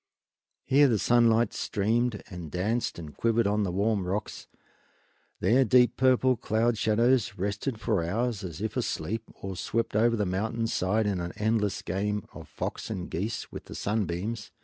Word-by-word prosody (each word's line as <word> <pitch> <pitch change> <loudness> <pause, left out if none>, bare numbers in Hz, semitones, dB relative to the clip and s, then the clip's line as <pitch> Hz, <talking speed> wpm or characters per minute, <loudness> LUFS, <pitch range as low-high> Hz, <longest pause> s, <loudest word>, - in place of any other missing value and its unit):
Here 140 +2 +5
the 115 -4 +2
sunlight 120 +1 +3
streamed 115 +2 0
and 90 -3 -7
danced 105 +9 -1
and 80 -4 -9
quivered 115 0 +2
on 105 +1 +1
the 95 -3 0
warm 100 0 0
rocks; 100 +3 -4 0.9
there 130 +4 +4
deep 125 -2 +4
purple 130 0 +3
cloud 115 +1 +1
shadows 115 +1 +2
rested 105 +5 -2
for 105 -6 0
hours, 110 +4 -1
as 85 -1 -6
if 110 0 -3
asleep, 110 +3 -2
or 95 -1 -6
swept 115 +4 -2
over 115 +2 +4
the 105 -2 0
mountain 110 +5 -1
side 110 0 +1
in 100 -3 0
an 85 0 -4
endless 105 -2 0
game 105 +2 -2
of - - -10
fox - - -5
and 95 -5 -5
geese 105 +7 -3
with - - -8
the - - -9
sunbeams. 105 +1 -2
110 Hz, 165 wpm, -28 LUFS, 95-115 Hz, 0.9 s, Here